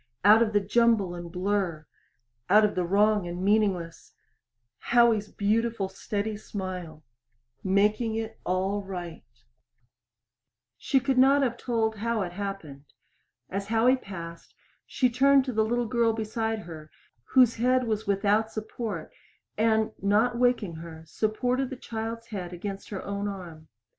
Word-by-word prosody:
Out 215 Hz, +2 st, +8 dB
of 225 Hz, -2 st, +2 dB
the 205 Hz, -, +3 dB
jumble 210 Hz, -2 st, +2 dB
and 175 Hz, -1 st, -8 dB
blur 180 Hz, -4 st, -1 dB, 0.6 s
out 210 Hz, +1 st, +6 dB
of 210 Hz, -, -1 dB
the 180 Hz, -, 0 dB
wrong 205 Hz, +1 st, +2 dB
and 175 Hz, +1 st, -5 dB
meaningless 195 Hz, -5 st, 0 dB, 0.7 s
Howie's 235 Hz, -3 st, +3 dB
beautiful 215 Hz, -1 st, 0 dB
steady 205 Hz, +2 st, -3 dB
smile 185 Hz, -7 st, -6 dB, 0.6 s
making 210 Hz, +4 st, +2 dB
it 225 Hz, 0 st, -5 dB
all 190 Hz, +3 st, -1 dB
right. 175 Hz, -6 st, -7 dB, 1.5 s
She 270 Hz, -, +1 dB
could 265 Hz, 0 st, +1 dB
not 275 Hz, +2 st, +5 dB
have 240 Hz, -3 st, 0 dB
told 225 Hz, -3 st, -1 dB
how 225 Hz, 0 st, -1 dB
it 175 Hz, -, -5 dB
happened. 180 Hz, -8 st, -6 dB, 0.6 s
As 200 Hz, +1 st, -4 dB
Howie 230 Hz, +4 st, +4 dB
passed, 170 Hz, -8 st, -9 dB, 0.3 s
she 255 Hz, -, +2 dB
turned 270 Hz, +2 st, +4 dB
to 255 Hz, -, -3 dB
the 220 Hz, 0 st, +2 dB
little 240 Hz, +2 st, 0 dB
girl 230 Hz, 0 st, +1 dB
beside 220 Hz, 0 st, -2 dB
her 160 Hz, -3 st, -10 dB, 0.5 s
whose 250 Hz, -3 st, +6 dB
head 255 Hz, +2 st, +2 dB
was 220 Hz, -3 st, -2 dB
without 205 Hz, +2 st, +1 dB
support 215 Hz, -5 st, -5 dB, 0.4 s
and, 220 Hz, 0 st, +2 dB
not 215 Hz, +5 st, +2 dB
waking 235 Hz, -8 st, +1 dB
her, 160 Hz, -1 st, -10 dB
supported 245 Hz, +8 st, -1 dB
the 265 Hz, -, -6 dB
child's 230 Hz, -1 st, -6 dB
head 180 Hz, -5 st, -5 dB
against 195 Hz, +2 st, -6 dB
her 195 Hz, -3 st, -5 dB
own 200 Hz, 0 st, -3 dB
arm. 175 Hz, -5 st, -8 dB
210 Hz, 140 wpm, -27 LUFS, 190-230 Hz, 1.5 s, Out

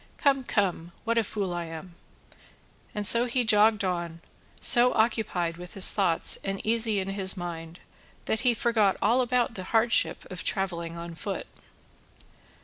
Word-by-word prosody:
Come, 275 Hz, -2 st, +1 dB
come, 180 Hz, -7 st, -2 dB
what 230 Hz, 0 st, +1 dB
a -, -, +1 dB
fool 195 Hz, -3 st, -4 dB
I 175 Hz, -1 st, -4 dB
am!" 165 Hz, +2 st, -9 dB, 1.0 s
And 210 Hz, -1 st, -1 dB
so 235 Hz, +4 st, +7 dB
he 250 Hz, +1 st, 0 dB
jogged 215 Hz, -1 st, +3 dB
on, 170 Hz, -3 st, -3 dB, 0.4 s
so 245 Hz, 0 st, +4 dB
occupied 205 Hz, -7 st, 0 dB
with 180 Hz, 0 st, -11 dB
his 195 Hz, -, +6 dB
thoughts 180 Hz, -5 st, +2 dB
and 195 Hz, 0 st, -4 dB
easy 225 Hz, -1 st, +1 dB
in 190 Hz, 0 st, -4 dB
his 195 Hz, 0 st, 0 dB
mind 170 Hz, -1 st, -7 dB, 0.5 s
that 220 Hz, -, -1 dB
he 250 Hz, -2 st, +2 dB
forgot 220 Hz, -4 st, +1 dB
all 235 Hz, +5 st, +2 dB
about 245 Hz, -1 st, 0 dB
the 185 Hz, -4 st, -7 dB
hardship 225 Hz, +2 st, +1 dB
of 180 Hz, -, -6 dB
travelling 170 Hz, -3 st, -3 dB
on 170 Hz, 0 st, -8 dB
foot. 160 Hz, -, -5 dB
195 Hz, 155 wpm, -26 LUFS, 175-230 Hz, 1.0 s, so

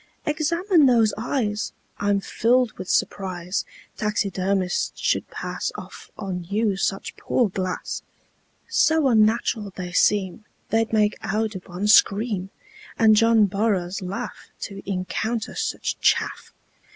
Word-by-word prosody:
"Examine 330 Hz, +1 st, +3 dB
those 230 Hz, -4 st, +4 dB
eyes. 220 Hz, -2 st, -2 dB, 0.3 s
I'm 205 Hz, -1 st, +1 dB
filled 245 Hz, +3 st, +2 dB
with 185 Hz, 0 st, -8 dB
surprise 185 Hz, -1 st, -1 dB, 0.3 s
Taxidermists 195 Hz, -3 st, -1 dB
should -, -, 0 dB
pass -, -, -4 dB
Off -, -, -10 dB
on 185 Hz, -4 st, -4 dB
you 205 Hz, +2 st, 0 dB
such 195 Hz, 0 st, -2 dB
poor 240 Hz, -5 st, +1 dB
glass; 185 Hz, -1 st, -3 dB, 0.7 s
So 320 Hz, -9 st, +3 dB
unnatural 220 Hz, -2 st, +2 dB
they 180 Hz, -1 st, -5 dB
seem 200 Hz, +2 st, +2 dB, 0.3 s
They'd 225 Hz, 0 st, +1 dB
make 210 Hz, -1 st, +2 dB
Audubon 205 Hz, -3 st, -2 dB
scream, 205 Hz, -2 st, +4 dB, 0.5 s
And 220 Hz, -1 st, +6 dB
John 225 Hz, 0 st, +5 dB
Burroughs 200 Hz, -2 st, -1 dB
laugh 185 Hz, +2 st, -6 dB
To 195 Hz, -1 st, -6 dB
encounter 220 Hz, +5 st, -2 dB
such -, -, -3 dB
chaff. -, -, +1 dB
210 Hz, 115 wpm, -24 LUFS, 190-225 Hz, 0.7 s, And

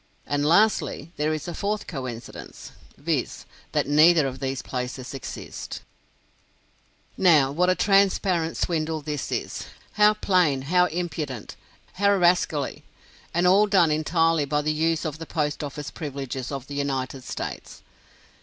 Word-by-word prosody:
And 145 Hz, 0 st, -1 dB
lastly, 170 Hz, -2 st, +2 dB
there 150 Hz, +1 st, +1 dB
is 155 Hz, +1 st, -3 dB
a 175 Hz, -, -4 dB
fourth 205 Hz, +5 st, -2 dB
coincidence, 130 Hz, -6 st, -7 dB, 0.3 s
viz., -, -, -2 dB, 0.3 s
that -, -, +1 dB
neither 155 Hz, +1 st, +5 dB
of 130 Hz, -1 st, -4 dB
these 135 Hz, 0 st, -3 dB
places 125 Hz, 0 st, -5 dB
exists. 135 Hz, -, -7 dB, 1.4 s
Now, 155 Hz, -8 st, +5 dB
what 180 Hz, +5 st, +2 dB
a 185 Hz, -, +3 dB
transparent 190 Hz, -3 st, +2 dB
swindle 160 Hz, -2 st, -1 dB
this 150 Hz, -2 st, -4 dB
is! -, -, -3 dB, 0.2 s
how 210 Hz, 0 st, +4 dB
plain, 180 Hz, -10 st, +2 dB
how 180 Hz, +5 st, +3 dB
impudent, 155 Hz, -8 st, -4 dB, 0.4 s
how 200 Hz, +1 st, +3 dB
rascally! 175 Hz, -5 st, +1 dB, 0.5 s
And 175 Hz, +1 st, +1 dB
all 195 Hz, +4 st, +5 dB
done 185 Hz, -6 st, +4 dB
entirely 165 Hz, 0 st, +2 dB
by 150 Hz, +1 st, 0 dB
the 155 Hz, +1 st, 0 dB
use 160 Hz, +1 st, 0 dB
of 155 Hz, -1 st, -4 dB
the 165 Hz, -, -7 dB
Post 150 Hz, -1 st, -2 dB
Office 145 Hz, 0 st, -6 dB
privileges 135 Hz, -4 st, -5 dB
of 135 Hz, -2 st, -5 dB
the 145 Hz, -, -9 dB
United 135 Hz, -2 st, -2 dB
States. -, -, -6 dB
155 Hz, 140 wpm, -25 LUFS, 140-175 Hz, 1.4 s, neither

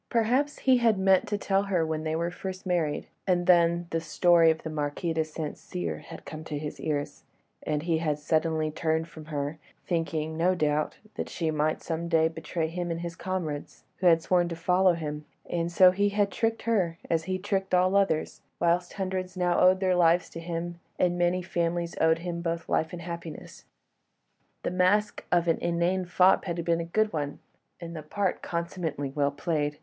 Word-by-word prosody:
Perhaps 250 Hz, +5 st, +1 dB
he 260 Hz, -1 st, +5 dB
had 230 Hz, -4 st, +3 dB
meant 190 Hz, 0 st, +3 dB
to 205 Hz, -, -1 dB
tell 195 Hz, -1 st, +1 dB
her 190 Hz, -5 st, 0 dB
when 160 Hz, 0 st, -2 dB
they 160 Hz, 0 st, -1 dB
were 170 Hz, +1 st, -1 dB
first 190 Hz, +1 st, -6 dB
married; 170 Hz, -5 st, 0 dB, 0.2 s
and 175 Hz, -1 st, +2 dB
then 170 Hz, -1 st, +4 dB
the 165 Hz, -, 0 dB
story 165 Hz, +1 st, +4 dB
of 160 Hz, 0 st, 0 dB
the 160 Hz, -, -4 dB
Marquis 150 Hz, +2 st, -2 dB
de 160 Hz, 0 st, +1 dB
St. 155 Hz, -1 st, -5 dB
Cyr 85 Hz, -3 st, -4 dB
had -, -, -11 dB
come 155 Hz, 0 st, -7 dB
to 150 Hz, -, -4 dB
his 150 Hz, 0 st, -6 dB
ears, 145 Hz, -2 st, -3 dB, 0.4 s
and 150 Hz, -1 st, -2 dB
he 165 Hz, -2 st, +1 dB
had 155 Hz, -3 st, 0 dB
suddenly 155 Hz, +1 st, 0 dB
turned 160 Hz, +1 st, -1 dB
from 160 Hz, -2 st, -11 dB
her, 150 Hz, 0 st, -4 dB, 0.3 s
thinking, 160 Hz, -2 st, -1 dB
no 180 Hz, +3 st, +2 dB
doubt, 150 Hz, -2 st, 0 dB, 0.2 s
that -, -, -4 dB
she 160 Hz, -2 st, -1 dB
might 155 Hz, 0 st, 0 dB
some 165 Hz, 0 st, -3 dB
day 160 Hz, -1 st, +4 dB
betray 160 Hz, 0 st, -3 dB
him 175 Hz, +1 st, -4 dB
and 165 Hz, 0 st, -3 dB
his 170 Hz, -1 st, -5 dB
comrades, 170 Hz, -6 st, -4 dB
who 185 Hz, -, +2 dB
had 165 Hz, -1 st, +5 dB
sworn 175 Hz, -2 st, +2 dB
to 170 Hz, -, -4 dB
follow 180 Hz, +2 st, +3 dB
him; 150 Hz, -2 st, -5 dB, 0.2 s
and 170 Hz, 0 st, -1 dB
so 180 Hz, +1 st, +7 dB
he 200 Hz, +2 st, +1 dB
had 205 Hz, -1 st, +1 dB
tricked 225 Hz, +2 st, -1 dB
her, 190 Hz, -8 st, +1 dB
as 160 Hz, -1 st, 0 dB
he 185 Hz, +1 st, -1 dB
tricked 195 Hz, -1 st, -1 dB
all 185 Hz, +2 st, +3 dB
others, 190 Hz, -6 st, +1 dB, 0.2 s
whilst 175 Hz, +1 st, +1 dB
hundreds 185 Hz, -1 st, -3 dB
now 180 Hz, -1 st, +2 dB
owed 185 Hz, +1 st, +5 dB
their 185 Hz, -1 st, +2 dB
lives 175 Hz, 0 st, +3 dB
to 165 Hz, -, -7 dB
him, 170 Hz, 0 st, -4 dB, 0.2 s
and 175 Hz, -1 st, +2 dB
many 175 Hz, +1 st, +1 dB
families 170 Hz, -1 st, -1 dB
owed 160 Hz, 0 st, +4 dB
him 170 Hz, -1 st, -3 dB
both 170 Hz, 0 st, -3 dB
life 160 Hz, -, 0 dB
and 170 Hz, -1 st, -7 dB
happiness. 170 Hz, -2 st, -8 dB, 1.0 s
The -, -, -1 dB
mask 185 Hz, +4 st, +2 dB
of 175 Hz, -1 st, +3 dB
the 165 Hz, -1 st, 0 dB
inane 175 Hz, +2 st, +1 dB
fop 180 Hz, +2 st, +4 dB
had 170 Hz, -2 st, -3 dB
been 170 Hz, 0 st, +2 dB
a -, -, -4 dB
good 215 Hz, +5 st, +1 dB
one, 145 Hz, -2 st, -3 dB, 0.4 s
and 170 Hz, -1 st, -7 dB
the 155 Hz, -, -5 dB
part 190 Hz, +5 st, -2 dB
consummately 170 Hz, -5 st, -3 dB
well 145 Hz, -1 st, +2 dB
played. 150 Hz, 0 st, -2 dB
170 Hz, 195 wpm, -28 LUFS, 160-185 Hz, 1.0 s, so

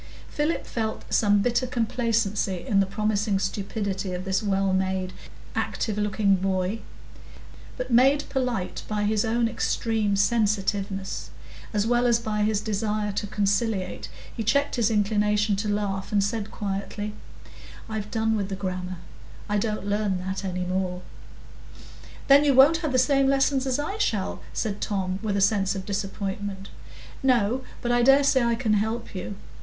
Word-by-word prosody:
Philip 300 Hz, +3 st, -1 dB
felt 220 Hz, -2 st, -3 dB
some 205 Hz, -2 st, +4 dB
bitter 245 Hz, +1 st, +1 dB
complacency 225 Hz, -6 st, 0 dB
in 205 Hz, -6 st, +2 dB
the 195 Hz, -, +3 dB
promising 210 Hz, 0 st, 0 dB
stupidity 195 Hz, 0 st, -2 dB
of 180 Hz, +1 st, -4 dB
this 190 Hz, +2 st, 0 dB
well 195 Hz, -2 st, +1 dB
made, 190 Hz, 0 st, -1 dB, 0.4 s
active 215 Hz, -, -2 dB
looking 205 Hz, -1 st, +2 dB
boy; 190 Hz, +2 st, -1 dB, 1.0 s
but -, -, -4 dB
made 270 Hz, +5 st, +4 dB
polite 250 Hz, -8 st, -2 dB
by 210 Hz, -1 st, -1 dB
his 210 Hz, 0 st, +2 dB
own 230 Hz, +1 st, +1 dB
extreme 220 Hz, -2 st, 0 dB
sensitiveness, 200 Hz, -2 st, 0 dB, 0.4 s
as 210 Hz, -1 st, +1 dB
well 240 Hz, +1 st, +3 dB
as 235 Hz, -1 st, +4 dB
by 215 Hz, -2 st, -2 dB
his 210 Hz, -1 st, +1 dB
desire 210 Hz, 0 st, -1 dB
to 205 Hz, +1 st, -3 dB
conciliate, 200 Hz, -1 st, -1 dB, 0.3 s
he 230 Hz, -, -3 dB
checked 280 Hz, +6 st, +2 dB
his 235 Hz, -3 st, +2 dB
inclination 210 Hz, -1 st, +2 dB
to 210 Hz, +1 st, -2 dB
laugh, 200 Hz, -2 st, -2 dB
and 205 Hz, -2 st, +3 dB
said 215 Hz, 0 st, -2 dB
quietly,— 205 Hz, +1 st, -4 dB, 0.7 s
"I've 215 Hz, -1 st, -4 dB
done 220 Hz, 0 st, +1 dB
with 200 Hz, -2 st, -2 dB
the 195 Hz, -, -3 dB
grammar; 185 Hz, -1 st, -4 dB, 0.5 s
I 210 Hz, 0 st, +1 dB
don't 215 Hz, -1 st, -2 dB
learn 205 Hz, -2 st, 0 dB
that 190 Hz, +1 st, -3 dB
any 180 Hz, -1 st, -2 dB
more." 180 Hz, 0 st, -2 dB, 1.2 s
"Then 280 Hz, +1 st, +7 dB
you 285 Hz, -3 st, +3 dB
won't 280 Hz, +5 st, +7 dB
have 315 Hz, -4 st, -2 dB
the 255 Hz, -, +2 dB
same 275 Hz, +1 st, +3 dB
lessons 270 Hz, 0 st, +2 dB
as 260 Hz, 0 st, +1 dB
I 390 Hz, +9 st, -3 dB
shall?" 205 Hz, -, -1 dB
said 205 Hz, -2 st, -3 dB
Tom, 190 Hz, -2 st, -1 dB
with 210 Hz, -3 st, -1 dB
a -, -, +1 dB
sense 195 Hz, -1 st, +2 dB
of 190 Hz, -1 st, -5 dB
disappointment. 200 Hz, -1 st, -4 dB, 0.5 s
"No; 250 Hz, -1 st, +2 dB, 0.2 s
but 240 Hz, -, 0 dB
I 240 Hz, 0 st, +3 dB
dare 270 Hz, +3 st, +6 dB
say 270 Hz, -1 st, +4 dB
I 235 Hz, 0 st, +2 dB
can 225 Hz, -3 st, 0 dB
help 220 Hz, +3 st, -1 dB
you. 190 Hz, +1 st, -5 dB
210 Hz, 160 wpm, -25 LUFS, 195-230 Hz, 1.2 s, Then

